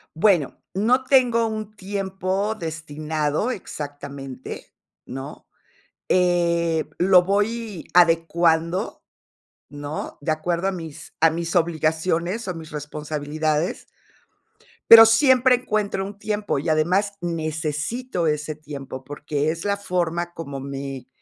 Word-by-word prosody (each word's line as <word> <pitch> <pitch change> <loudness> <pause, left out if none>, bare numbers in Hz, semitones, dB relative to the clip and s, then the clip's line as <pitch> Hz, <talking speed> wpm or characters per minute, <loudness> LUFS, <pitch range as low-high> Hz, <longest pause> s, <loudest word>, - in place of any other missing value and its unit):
Bueno, 170 -5 +3 0.2
no 245 +6 +3
tengo 245 -4 +4
un 215 -1 -5
tiempo 195 +1 -2
destinado 155 +1 -2
exactamente, 140 - -7 0.3
¿no?, 135 +3 -8 0.6
eh, 170 -3 +2
lo 180 0 +6
voy 205 0 -1
adecuando, 170 +1 +2 0.7
¿no?, 145 +1 -6
de 155 - -1
acuerdo 170 +4 -1
a - - -2
mis 160 -4 -8
a 165 - +6
mis 165 +1 -3
obligaciones, 170 +5 0
o, - - -1
a - - -5
mis 160 -2 -9
responsabilidades. 150 +2 -2 1.0
Pero 225 0 +12
siempre 255 +2 +5
encuentro 210 -5 -1
un 200 0 -8
tiempo, 210 -8 -1
y 155 - -3
además 180 +6 +2
necesito 165 - -2
ese 150 0 -1
tiempo, 140 -3 -8
porque 145 +1 -2
es 165 +1 -6
la 200 0 +1
forma 175 -2 -2
como 140 -4 -6
me 135 -1 -6
170 Hz, 115 wpm, -23 LUFS, 155-200 Hz, 1.0 s, Pero